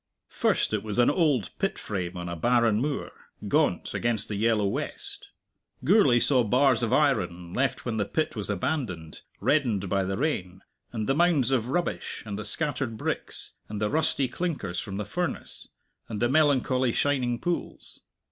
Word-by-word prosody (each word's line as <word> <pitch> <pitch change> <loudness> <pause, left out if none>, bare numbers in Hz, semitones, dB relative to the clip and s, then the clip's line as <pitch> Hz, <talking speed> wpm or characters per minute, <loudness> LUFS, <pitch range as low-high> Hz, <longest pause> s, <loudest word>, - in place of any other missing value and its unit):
First - - +1
it 105 - +1
was 105 0 -5
an 120 - +5
old 145 - +1
pit - - 0
frame 90 -2 -4
on 90 0 -5
a 85 - -4
barren 115 +3 +2
moor, 145 0 -2 0.4
gaunt, - - +1
against 115 -3 -1
the 105 - -2
yellow 110 0 +2
west. 100 - -4 0.5
Gourlay 150 - +5
saw 130 0 +6
bars 125 +2 +3
of 115 -1 0
iron, 90 - +1
left 130 -1 -1
when 115 -3 -2
the 105 - +1
pit 155 +8 -1
was 105 -2 -4
abandoned, 100 - -3 0.2
reddened 115 -11 +1
by 100 0 +1
the 95 +1 -2
rain; 95 - -2 0.3
and 110 -3 -3
the 135 - +3
mounds 150 -5 +3
of 125 -2 +1
rubbish, 175 +6 -2
and 105 -2 -5
the 105 - -5
scattered 130 -2 -2
bricks, - - -4 0.2
and 105 -1 -4
the 105 0 0
rusty 145 -3 +1
clinkers 135 - -3
from 95 -2 -5
the 105 - -3
furnace, 175 - -4 0.4
and 110 -2 -4
the 120 - +3
melancholy 130 -3 +2
shining 130 -4 +1
pools. 175 +5 -4
120 Hz, 170 wpm, -27 LUFS, 105-140 Hz, 0.5 s, saw